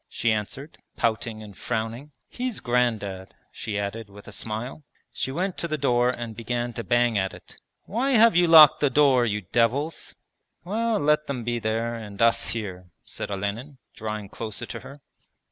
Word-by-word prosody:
she 120 - 0
answered, 110 +8 -4 0.2
pouting 110 -1 -1
and 105 -2 -11
frowning. 115 - -4 0.2
'He's 250 -3 -4
Grandad,' 110 -6 -1 0.2
she 105 -2 -4
added 100 +2 -4
with 100 +1 -14
a - - -8
smile. 115 +7 -5 0.3
She 130 - -3
went 180 +6 -2
to 170 - -2
the 155 -1 -2
door 125 -3 +2
and 120 -3 -4
began 120 +2 -3
to 115 - -5
bang 120 -3 +2
at 95 0 -2
it. - - -16 0.3
'Why 260 +6 0
have 230 -3 +6
you 175 0 +5
locked 155 -2 +9
the 145 - +3
door, 130 -3 +4
you 105 -1 -1
devils?' 120 - 0 0.5
'Well, 220 +4 0
let 150 +1 +2
them 130 -4 -3
be 120 +1 -1
there 115 +1 -1
and 105 -4 -8
us 115 0 +3
here,' 95 -5 -4
said - - -6
Olenin, 105 +8 -4 0.2
drawing 110 -2 -5
closer 110 -1 -5
to - - -7
her. 140 +1 -12
120 Hz, 175 wpm, -25 LUFS, 110-145 Hz, 0.5 s, locked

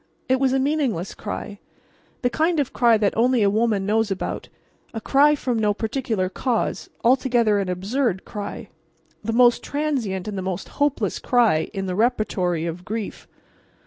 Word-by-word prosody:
It 260 0 +2
was 265 -1 +2
a 265 - +2
meaningless 265 - 0
cry, 205 -1 -6 0.6
the 245 - +3
kind 320 +6 +1
of 280 - -1
cry 235 -2 +4
that 205 -2 +1
only 240 0 +3
a 200 - +3
woman 215 -2 +1
knows 220 +1 +1
about, 195 - -4 0.5
a - - -2
cry 285 +6 +4
from 250 -5 -1
no 210 -1 +1
particular 220 -4 -1
cause, 230 +5 -2
altogether 240 -4 +3
an 195 -2 -2
absurd 195 +3 -1
cry; 205 -1 -6 0.5
the 225 - -2
most 240 +1 +4
transient 255 -11 -2
and 210 - -4
the 190 - -3
most 185 -1 -4
hopeless 260 -9 +1
cry 230 -11 +2
in 195 -1 -4
the 185 - -2
repertory 185 -6 0
of 170 +1 -5
grief. 215 +2 -5
225 Hz, 165 wpm, -23 LUFS, 195-255 Hz, 0.6 s, cry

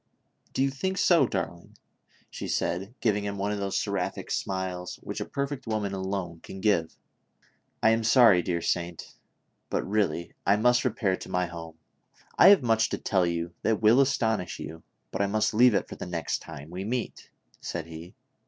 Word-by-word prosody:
"Do 135 - +1
you 135 - +1
think 190 +8 -2
so, 165 -10 +5
darling?" 85 -5 -5 0.5
she - - -6
said, 95 +7 -2
giving 105 -3 +1
him 100 0 -3
one 100 +1 -1
of 105 - -2
those 100 -1 -1
seraphic - - -2
smiles 95 -2 -3
which - - -5
a - - -2
perfect 140 -2 -4
woman 105 -3 -1
alone 95 -3 -3
can 95 - -10
give. 95 -6 +1 0.4
" - - -37
I 110 - +6
am 115 0 +1
sorry, 110 -5 +6
dear 85 -1 -2
saint, 85 -1 -2 0.6
but - - -1
really, 100 -4 0
I 100 - +4
must 120 +3 +3
repair 105 -6 +1
to - - -10
my 90 0 +1
home; 85 -2 -9 0.6
I - - +7
have 195 -7 +7
much 115 -1 +2
to - - -2
tell 95 -4 +1
you 85 0 -2
that 110 -2 +1
will 115 +5 +6
astonish 110 -9 0
you, 80 0 -7 0.3
but - - -2
I 100 - +2
must 110 +2 +1
leave 120 0 +6
it - - 0
for - - -8
the - - -6
next 85 -2 -2
time 75 0 -10
we 90 +2 -5
meet," 120 +3 -4 0.3
said 85 -2 -5
he. 85 +2 -10
100 Hz, 190 wpm, -27 LUFS, 90-115 Hz, 0.6 s, I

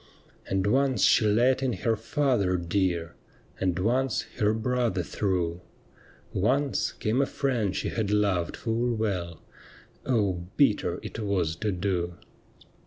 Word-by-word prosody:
And 95 0 0
once 130 +4 +2
she 110 - +5
let 120 +5 +3
in 130 -2 0
her 115 -1 0
father 110 -7 +1
dear, 85 -1 -1 0.5
And 90 -2 0
once 120 +6 +1 0.2
her 105 0 +3
brother 115 -3 0
through; 90 -2 -1 0.7
Once 135 +8 +1
came 115 +5 0
a 135 - +1
friend 115 -9 -1
she - - -1
had 110 -3 -2
loved 100 -5 +1
full 120 +1 -1
well. 90 -7 -3 0.6
Oh, 100 -8 0
bitter 135 -8 +2
it - - -6
was 95 -7 0
to 105 +3 -1
do 90 -2 -1
105 Hz, 130 wpm, -27 LUFS, 90-120 Hz, 0.7 s, she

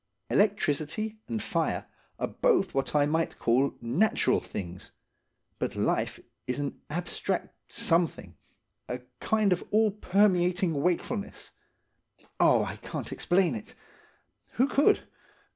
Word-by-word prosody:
Electricity 205 +1 +1
and 220 - -3
fire - - -1 0.3
are - - -1
both 450 - +2
what 135 +2 -1
I 145 -1 +5
might 160 +2 0
call 130 +4 +2
natural 155 - +2
things, 90 -2 -7 0.7
but - - -2
life - - 0 0.3
is 125 - -1
an 145 -1 -4
abstract 170 +4 -2 0.2
something–a 125 - -2 0.2
kind 215 -3 +2
of 175 - -3
all 215 0 +3
permeating 180 -5 +2
wakefulness. 180 +5 -2 0.9
Oh, - - +5
I - - -6
can't - - -6
explain 180 0 +2
it! 220 0 -8 0.8
Who 260 - +3
could? 280 +1 +3
180 Hz, 110 wpm, -28 LUFS, 145-210 Hz, 0.9 s, I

